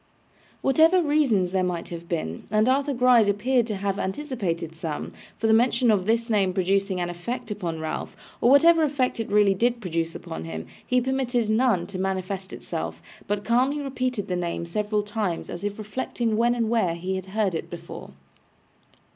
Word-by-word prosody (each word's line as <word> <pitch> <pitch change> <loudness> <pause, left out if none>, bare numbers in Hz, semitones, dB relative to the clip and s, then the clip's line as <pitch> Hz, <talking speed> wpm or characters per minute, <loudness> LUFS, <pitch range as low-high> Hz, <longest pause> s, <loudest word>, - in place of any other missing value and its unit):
Whatever 320 +7 +5
reasons 285 - +2
there 190 0 +1
might 175 -2 -3
have 170 0 -8
been 85 - -3
and 215 +2 +2
Arthur 275 +2 +2
Gride 245 -4 +5
appeared 240 +4 +1
to 215 - -2
have 200 0 -2
anticipated 190 - -3
some 160 -2 -4 0.3
for - - -3
the 220 - +5
mention 240 +1 +4
of 195 -2 +1
this 230 +1 +2
name 200 -5 +2
producing 195 0 +1
an 175 0 -2
effect 210 +6 -5
upon 175 -6 -3
Ralph, 160 +4 -5 0.2
or 240 - +5
whatever 330 +4 +6
effect 285 -6 0
it 225 - -3
really 205 -1 +4
did 240 +5 +1
produce 165 -5 -2
upon 80 0 -6
him, 80 0 -6 0.2
he 250 - +2
permitted 250 -3 0
none 220 -6 +2
to 195 -2 -7
manifest 190 0 -3
itself, 80 0 -5 0.3
but 205 0 -2
calmly 255 +5 +2
repeated 255 -6 -2
the 180 - -1
name 170 -1 -2
several 210 +4 -1
times, 205 -4 -3
as 175 - -7
if 205 0 -3
reflecting 225 +1 -2
when 235 +2 +3
and 230 -2 0
where 190 -8 +2
he 185 +3 -3
had 190 0 -5
heard 200 -1 0
it 165 - -4
before. - - -8
210 Hz, 180 wpm, -25 LUFS, 180-245 Hz, 0.3 s, whatever